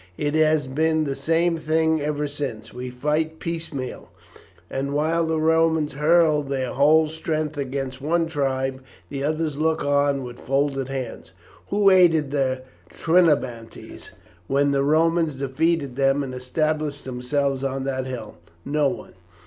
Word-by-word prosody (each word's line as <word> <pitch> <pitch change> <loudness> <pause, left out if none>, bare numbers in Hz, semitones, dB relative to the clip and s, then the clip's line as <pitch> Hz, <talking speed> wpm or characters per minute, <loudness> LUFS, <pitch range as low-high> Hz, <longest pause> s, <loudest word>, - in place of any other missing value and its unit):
It 145 0 -1
has 155 -2 +3
been 155 +4 +1
the 140 -2 -2
same 165 +4 +1
thing 160 0 +1
ever 150 0 -1
since. 130 -7 -6
We 125 +1 -6
fight 150 +5 -1
piecemeal; 160 -6 -5 0.6
and 140 +1 -3
while 160 +2 +1
the 160 -1 0
Romans 160 -2 +2
hurl 155 +1 +3
their 135 -2 -3
whole 155 +4 +4
strength 155 -1 -3
against 135 -1 -4
one 165 +3 +1
tribe 135 -4 -2 0.3
the 140 -1 -4
others 155 0 -1
look 160 +1 +1
on 140 -1 +2
with 120 -1 -9
folded 135 0 0
hands. 130 -3 -6 0.3
Who 200 -1 +4
aided 165 -6 +4
the 130 -2 0 0.3
Trinobantes 140 - 0 0.4
when 140 +1 +2
the 140 -1 +2
Romans 160 +1 +2
defeated 140 +1 0
them 135 +1 +2
and 130 -2 -6
established 150 +3 -2
themselves 135 +2 -1
on 135 0 -2
that 130 -1 -2
hill? 115 -8 -7 0.3
No 150 0 +1
one. - - -8
145 Hz, 140 wpm, -23 LUFS, 135-160 Hz, 0.6 s, whole